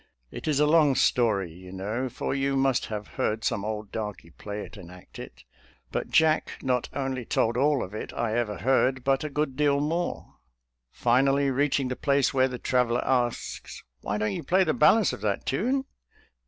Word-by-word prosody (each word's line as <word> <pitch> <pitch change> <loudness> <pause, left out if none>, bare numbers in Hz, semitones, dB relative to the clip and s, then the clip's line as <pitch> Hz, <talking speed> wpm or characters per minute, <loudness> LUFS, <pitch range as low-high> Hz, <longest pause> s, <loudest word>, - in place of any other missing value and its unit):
It - - -7
is 150 -2 +2
a 150 - +5
long 150 -3 +4
story 110 -8 +2
you 90 +1 -12
know, 105 +7 -3
for 125 - -3
you 135 0 0
must 135 -1 +1
have 105 -1 -5 0.2
heard 110 +1 0
some 110 -4 -1
old 105 -1 -4
darky 105 -6 -6
play 105 +3 -7
and 95 -5 -11
act 90 0 -13
it; - - -10 0.5
but - - -3
Jack 160 -1 +3
not 125 -2 0
only 135 -2 -3
told 115 0 0
all 140 +1 +2
of 95 - -8
it 110 - -5
I 115 -2 -2
ever 115 -4 -1
heard, 130 0 +2
but 135 +1 +1
a 150 - -3
good 145 -2 -2
deal 145 -1 +2
more. 165 +4 -3 0.5
Finally, 135 - +2
reaching 140 0 +1
the 130 - -2
place 140 -1 +1
where 130 -1 +3
the 125 -1 -5
traveler 125 -1 +1
asks, 120 -2 -2 0.2
"Why 100 +10 -3
don't 105 -1 -1
you - - -4
play 185 +7 +3
the 160 - +1
balance 205 +7 +4
of - - -7
that 105 -2 -1
tune? 255 - 0
130 Hz, 190 wpm, -26 LUFS, 110-140 Hz, 0.5 s, a